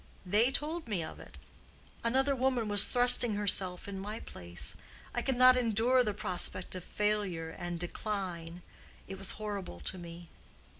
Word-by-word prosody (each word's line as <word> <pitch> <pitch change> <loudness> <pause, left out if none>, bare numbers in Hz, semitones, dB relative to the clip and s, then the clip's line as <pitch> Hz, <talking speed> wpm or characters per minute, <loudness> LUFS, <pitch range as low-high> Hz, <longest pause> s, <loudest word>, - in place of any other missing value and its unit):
They 210 +7 +4
told 310 +4 -2
me 195 -7 -1
of 155 - -8
it. - - -12 0.7
Another 265 +4 +2
woman 255 -3 +1
was 205 -1 +4
thrusting 245 -3 +4
herself 190 -3 +1
in 195 -1 -5
my 210 +3 -5
place. 85 0 -3 0.4
I - - -1
could 265 - 0
not 255 +1 +8
endure 245 +1 +3
the 215 - -1
prospect 185 -1 0
of 185 -2 -5
failure 200 -7 -1
and 175 -1 -5
decline. 175 -2 -4 0.4
It 190 -1 -7
was 195 - -1
horrible 200 - -5
to 185 - -4
me." 170 0 -10
205 Hz, 155 wpm, -32 LUFS, 180-245 Hz, 0.7 s, not